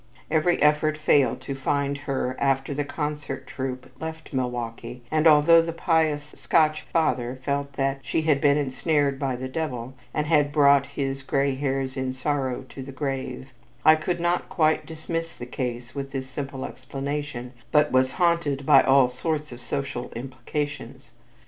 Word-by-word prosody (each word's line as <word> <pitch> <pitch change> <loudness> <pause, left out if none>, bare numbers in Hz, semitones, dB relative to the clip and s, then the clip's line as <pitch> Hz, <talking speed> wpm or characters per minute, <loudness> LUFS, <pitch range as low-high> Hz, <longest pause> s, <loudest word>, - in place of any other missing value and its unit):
Every 165 +2 +2
effort 150 +1 +3
failed 145 -3 +3
to 140 - -5
find 140 +1 0
her 135 -3 -2
after 135 0 +1
the 145 +1 -1
concert 150 -1 -4
troupe 130 -1 -5
left 160 -1 -7
Milwaukee 120 -1 -4
and 155 +1 +4
although 160 +2 +7
the 165 0 -3
pious 160 -3 +1
Scotch 155 -2 +3
father 130 -6 0
felt 140 0 -1
that 135 0 0
"she 160 - -1
had 150 -3 +2
been 145 0 +4
ensnared 145 0 0
by 135 -3 -1
the 130 +1 -5
Devil," 130 -4 -4 0.2
and 150 +3 -1
had 150 -2 +3
brought 140 -2 +5
his 135 -1 -3
"gray 135 +1 +1
hairs 135 0 -2
in 130 -1 -1
sorrow 130 -1 -1
to 135 - -8
the 135 +1 -7
grave," 135 -1 -4 0.4
I 155 - +9
could 175 +3 -2
not 175 +1 0
quite 155 -1 +2
dismiss 165 +1 -4
the 120 - -6
case 125 -1 -4
with 140 -1 -4
this 130 -1 -3
simple 135 0 -5
explanation, 135 -1 -5 0.2
but 150 -1 +4
was 130 0 +3
haunted 170 -6 +1
by - - +7
all 135 -1 +5
sorts 150 +4 -3
of 120 0 -10
social 140 0 -4
implications. 130 0 -5
140 Hz, 160 wpm, -25 LUFS, 130-150 Hz, 0.4 s, I